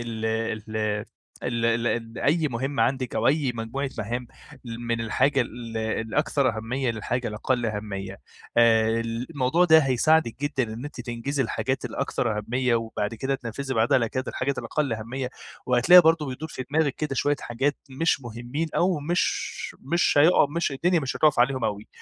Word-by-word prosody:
ال 115 -2 -5
ال 110 -1 -2 0.4
ال 120 -2 -1 0.2
ال 115 -1 -2
أي 155 +1 +2
مهمة 130 0 -1
عندِك 130 +1 -1
أو - - +1
أي 140 -3 +2
مجموعة 120 +5 -3
مهام 120 +3 -3 0.4
ل 115 -1 -6
من 115 -1 -2
الحاجة 135 +5 +2
ال 115 -1 -5
الأكثر 115 +3 0
أهمية 125 +3 -1
للحاجة 120 +2 -2
الأقل 120 +3 -1
أهمية. 100 -3 -5 0.4
آآ 115 -1 +4
الموضوع 125 +7 0
ده 160 -2 +7
هيساعدِك 135 -1 +2
جدًا 145 -2 0
إن 115 +4 -7
أنتِ 145 -3 -7
تنجزي 125 +3 -2
الحاجات 130 +3 -2
الأكثر 120 -5 -1
أهمية 125 +3 0
وبعد 115 -2 -2
كده 135 +4 -1
تنفّذي 130 +1 -4
بعدها 115 +1 +3
على 115 -2 0
كده 130 +3 -3
الحاجات 140 +1 -2
الأقل 145 -6 -1
أهمية. 125 +4 -4 0.4
وهتلاقي 125 +9 +7
برضه 160 -2 +3
بيدور 135 +4 -5
في 130 - -6
دماغِك 150 -2 +2
كده 150 -3 -3
شوية 145 +2 +1
حاجات 135 +5 -1
مش 140 +1 +1
مهمّين 120 +6 -4
أو 180 -3 +2
مش 170 +5 +1 0.4
مش 170 +7 +1
هيقع 160 +1 +6
مش 170 -4 0
الدنيا 170 +5 +2
مش 135 -2 -3
هتُقف 150 -4 +3
عليهم 130 0 +2
أوي. 105 -1 -3
125 Hz, 165 wpm, -25 LUFS, 115-140 Hz, 0.4 s, ده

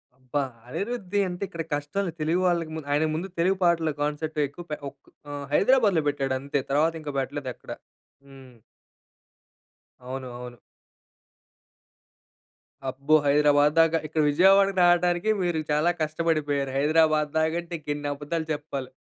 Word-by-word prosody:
అబ్బా! 135 +2 -2 0.2
అనిరుద్‌ది 205 - -3
అంటే 175 +2 -5
ఇక్కడ 170 -3 -5
కష్టాలు 165 +6 -2
తెలుగు 165 +4 +1
వాళ్ళకి 170 -2 0
ముంద్ 150 -3 -7
ఆయనకు 155 +2 +2
ముందు 175 +4 -3
తెలుగు 185 +3 +2
పాటల 165 -2 +2
కాన్సర్ట్ 150 +1 -2
ఎక్కువ 170 +5 -11
పే - - -2
ఒక్ - - -25 0.3
ఆహ్, 145 -1 -5
హైదరాబాద్‌లో 200 - +4
బెట్టాడు 135 -2 -1
అంతే. 140 +1 -2
తరువాత 155 +3 +2
ఇంకా 145 -2 -6
బెట్టలేదు 135 0 -4
ఎక్కడ. - - -12 0.6
హ్మ్. 130 -3 -15 1.5
అవును. 130 0 -5
అవును. 125 -1 -9 2.3
అబ్బో! 140 +4 +2
హైదరాబాద్ 145 0 +4
దాక. 165 0 +5
ఇక్కడ 155 +1 0
విజయవాడకి 195 +5 +4
రాటానికి 175 +3 +3
మీరు 175 -3 0
చాలా 155 +4 +3
కష్టబడిపోయారు. 155 -3 0
హైదరాబాద్ 155 0 +3
దాకంటే 170 +2 -1
ఇంకెన్ని 145 -1 -4
అబద్దాలు 155 +3 -4
జెప్పాల్ 145 -3 -4
155 Hz, 130 wpm, -26 LUFS, 145-170 Hz, 2.3 s, దాక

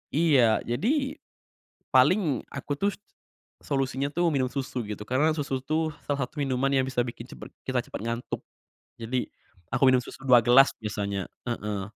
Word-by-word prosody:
Iya, 140 -9 +4
jadi, 270 - 0 0.7
paling 175 - +4
aku 140 +1 -4
tuh 200 +8 +1 0.7
solusinya 135 0 -1
tuh 175 +2 +2
minum 130 -2 +1
susu 130 -2 -3
gitu, 105 0 -6
karena 140 +6 +2
susu 135 -3 -2
tuh 155 +2 0
salah 140 -3 0
satu 145 +3 -6
minuman 135 0 +1
yang 130 -1 +3
bisa 125 -2 0
bikin 120 0 -7
cepet - - -10 0.2
kita 130 -1 +1
cepet - - -7
ngantuk, 115 +1 -3 0.6
jadi 120 +2 -2 0.5
aku - - -1
minum 130 -1 +4
susu 130 - -11
2 125 -2 +7
gelas 135 +3 +7
biasanya, 100 -3 -3 0.2
heeh. 105 -4 -3
130 Hz, 155 wpm, -27 LUFS, 120-145 Hz, 0.7 s, 2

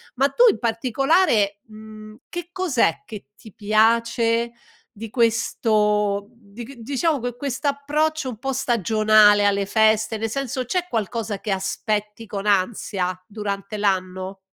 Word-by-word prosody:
Ma 270 +2 +2
tu 475 - +2
in - - -1
particolare, 235 - +1
mhmm, 215 0 -12
che 350 0 -6
cos'è 300 - +1
che 215 -3 -9
ti 220 - -15
piace 230 +2 +2 0.4
di 225 0 -8
questo, 210 -3 +1
mhmm, - - -28 0.2
dic 240 +4 -9
diciamo 280 +6 -1
que 245 0 -4
quest'approccio 285 +3 -1
un 235 - -7
po' 270 +2 -2
stagionale 215 -4 +4
alle 200 0 +1
feste, 220 +1 +2
nel 225 +1 -3
senso, 260 +1 -3
c'è 360 +7 -2
qualcosa 220 -2 -3
che 210 - -4
aspetti 210 +3 -3
con 200 -1 -5
ansia 190 -2 0
durante 205 0 -5
l'anno? 190 -1 -2
220 Hz, 130 wpm, -22 LUFS, 205-250 Hz, 0.4 s, stagionale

